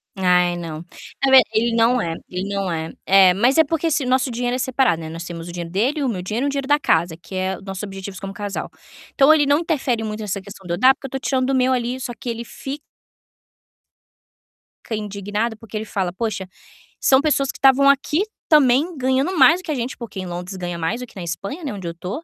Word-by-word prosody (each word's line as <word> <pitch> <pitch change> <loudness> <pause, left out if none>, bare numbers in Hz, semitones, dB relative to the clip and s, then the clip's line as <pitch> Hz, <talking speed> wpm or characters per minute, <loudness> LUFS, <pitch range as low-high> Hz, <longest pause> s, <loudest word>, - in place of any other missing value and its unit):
Ai, 180 -2 +3
não. 165 -1 -6 0.4
A 270 - +4
ver. 265 - +10
Ele 230 +1 +1
não 235 +2 +3
é 165 -6 -2 0.2
ele 185 +2 -4
não 195 -2 -1
é. 160 -1 -3
É, 190 -1 +6
mas 240 - +2
é 320 - +7
porque 325 +1 -1
se 290 -3 0
nosso 255 +1 +2
dinheiro 245 +1 -1
é 255 - -3
separado, 255 -10 +1
né. 160 - -6
Nós 165 +1 -6
temos 170 -1 -7
o - - -6
dinheiro 170 -1 -6
dele, 260 - 0
o 260 - +1
meu 185 -5 -3
dinheiro 215 +9 -2
e - - +1
o - - +1
dinheiro 275 -1 -3
da 290 0 +4
casa, 160 - +1
que 175 - -14
é 190 0 -1
os - - -15
nossos 195 0 -6
objetivos 195 -1 -7
como 195 -1 -6
casal. 205 -1 -5 0.4
Então 280 +3 +6
ele 295 -2 +3
não 285 +2 +4
interfere 265 -9 -1
muito 215 0 -4
nessa 205 -2 -3
questão 195 -1 -12
de 170 - -2
eu - - -1
dar, 260 +7 +6
porque 270 - -9
eu - - -16
tô 270 - -3
tirando 260 -1 0
do 270 - +1
meu 260 0 +3
ali, 245 +1 -2
só 255 -1 -4
que 245 - -6
ele 235 0 -4
fi 270 +4 -7 2.1
Fica 225 - -3
indignado, 210 +2 -3
porque 220 0 -8
ele 220 - -4
fala: 190 -4 -2
"Poxa, 195 -1 -3 0.5
são 265 - +5
pessoas 280 -3 +1
que - - -15
tavam 275 +1 +6
aqui 280 +5 +2 0.3
também 300 +3 +4
ganhando 265 +7 0
mais 310 +6 +6
do - - -26
que 315 - -3
a - - 0
gente", 245 +1 -4
porque 230 -5 -7
em 185 - -4
Londres 180 +2 -6
ganha 175 -1 -4
mais 210 +9 -2
do 250 - -6
que - - -20
na 185 - -6
Espanha, 195 - -5
né, 280 - -3
onde 190 -4 -6
eu 170 - -4
tô." 185 - -6
225 Hz, 250 wpm, -21 LUFS, 185-265 Hz, 2.1 s, ver